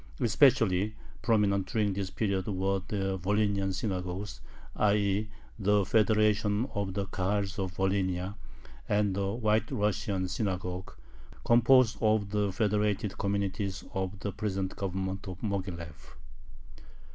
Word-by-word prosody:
Especially 110 -5 +3 0.3
prominent 100 -4 +2
during 105 -3 0
this 95 -1 -3
period 100 -4 -1
were 95 -1 0
the 95 -2 -1
"Volhynian 100 +1 +1
Synagogue," 95 0 -3 0.5
i. 105 -1 +3
e. 100 +1 0 0.3
the 105 0 +3
federation 105 0 +3
of 100 -3 -2
the 100 -1 -1
Kahals 100 +1 -1
of 95 -2 -3
Volhynia, 95 -1 0 0.6
and 105 -1 +2
the 100 0 0
"White 110 -1 +1
Russian 100 -2 0
Synagogue," 90 -2 -3 0.5
composed 120 0 +5
of 110 -2 +2
the 105 -1 +1
federated 105 0 0
communities 100 -1 -1
of 95 +1 -2
the 100 - -2
present 95 -2 -3
Government 95 0 -3
of 90 -1 -6
Moghilev. 90 -7 -5
100 Hz, 120 wpm, -30 LUFS, 95-105 Hz, 0.6 s, composed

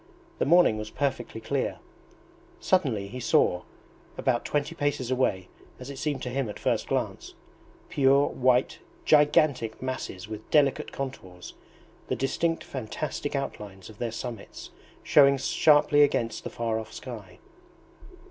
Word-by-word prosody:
The - - +2
morning 165 -9 +5
was 110 0 -5
perfectly 125 -4 -3
clear. 135 +4 -2 0.8
Suddenly 135 - +1
he 125 +5 -7
saw, 90 -6 +2 0.6
about 120 -2 0
twenty 150 +3 -1
paces 145 -5 -2
away 100 -8 0 0.3
as 130 +2 -7
it 135 - -8
seemed 145 -4 -2
to 125 - -3
him 135 -3 -1
at 105 - -7
first - - -1
glance, - - -3 0.5
pure 140 +1 +4
white 130 0 +1 0.3
gigantic 145 -6 +3
masses 130 -7 -5
with 110 0 -8
delicate 145 -3 +2
contours, 95 -10 -7 0.5
the - - -1
distinct 165 +5 -1
fantastic 135 +4 -4
outlines 105 -7 -6
of 105 - -18
their 120 -2 -2
summits 115 -2 -7 0.3
showing 140 -1 +5
sharply 145 +2 +4
against 120 -5 +1
the - - -5
far 115 -1 -2
off 110 0 -9
sky. 105 -8 -9
130 Hz, 135 wpm, -27 LUFS, 110-140 Hz, 0.8 s, morning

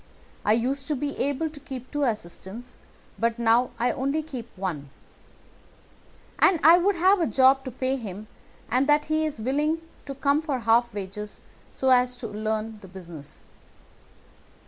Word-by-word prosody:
I 210 - +3
used 265 +4 -1
to 300 - 0
be 285 +2 -3
able 285 +3 0
to 295 - -12
keep 260 -3 -9
two 290 - -2
assistants, 215 +2 -5 0.4
but 230 0 +1
now 235 +1 +3
I 245 +2 +1
only 275 +4 -1
keep 255 -7 -7
one; 165 -7 -4 1.5
and 350 - +5
I 330 +4 +8
would 395 +3 +2
have 370 +3 +4
a 330 - +2
job 265 +3 +4
to - - -3
pay 260 +2 -1
him 210 -3 -7 0.4
but 255 +4 +1
that 295 0 +3
he 310 0 +2
is 295 - -6
willing 295 +7 0 0.3
to 275 - -5
come 280 +2 +2
for 285 -6 -2
half 230 +2 +3
wages 205 +1 -7 0.3
so 265 -1 +1
as 250 0 +4
to 245 -2 -6
learn 215 +1 -3
the 190 - -11
business." 170 -6 -11
255 Hz, 165 wpm, -26 LUFS, 220-285 Hz, 1.5 s, I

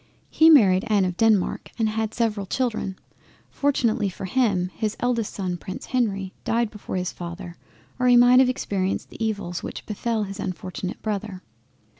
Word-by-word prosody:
He 320 0 +6
married 200 -11 +6
Anne 205 -3 +3
of 180 -1 -2
Denmark, 215 -2 +2
and 225 -2 +1
had 220 0 -2
several 215 -4 -1
Children; 220 -5 -2 0.5
fortunately 235 -7 +1
for 190 - -7
him 190 -4 +1
his 215 -2 -2
eldest 240 -3 0
son 180 -3 -3
Prince 185 +2 -7
Henry 200 -7 -1
died 230 -1 0
before 210 - -7
his 180 -1 -1
father 175 0 -8 0.4
or 250 - +2
he 245 -1 +7
might 245 +1 +7
have 260 -1 +5
experienced 195 -6 -2
the - - -5
evils 200 -5 -2
which - - -7
befell 220 +1 -2
his 195 -1 -7
unfortunate 185 0 -5
Brother. 205 -3 -4
210 Hz, 165 wpm, -24 LUFS, 185-235 Hz, 0.5 s, he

